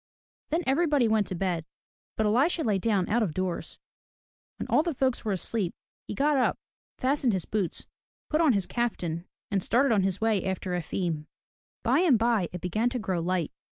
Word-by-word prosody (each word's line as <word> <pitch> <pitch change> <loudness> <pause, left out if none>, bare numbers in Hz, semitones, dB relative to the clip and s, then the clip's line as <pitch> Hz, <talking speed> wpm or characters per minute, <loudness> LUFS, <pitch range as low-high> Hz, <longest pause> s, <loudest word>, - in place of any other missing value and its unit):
Then 330 +3 0
everybody 290 -2 +3
went 220 -2 +2
to 185 - -3
bed. 175 -2 -1 0.5
But 220 - +1
Elisha 275 +10 +2
lay 210 -6 +1
down 200 -3 +1
out 235 +3 +2
of 180 -9 -1
doors. 185 -2 -3 0.8
When - - -4
all - - +4
the 330 -2 -2
folks 260 -1 0
were 215 - -1
asleep, 190 0 -1 0.3
he - - -4
got 290 +3 +2
up, 255 - +2 0.4
fastened 260 -3 +1
his 185 -3 0
boots, 205 -5 -2 0.4
put 310 +1 +1
on 310 -6 +5
his 200 -3 +2
kaftan, 180 -8 -2 0.3
and 195 -2 +1
started 250 +7 +3
on 205 - +3
his 190 0 0
way 220 -3 +1
after 190 -1 -3
Efim. 170 -2 -2 0.6
By - - +3
and 335 -9 +5
by 225 -5 +1
it 180 - -6
began 215 +7 0
to 250 - -3
grow 190 -6 -1
light. 175 -1 -1
215 Hz, 185 wpm, -28 LUFS, 185-255 Hz, 0.8 s, on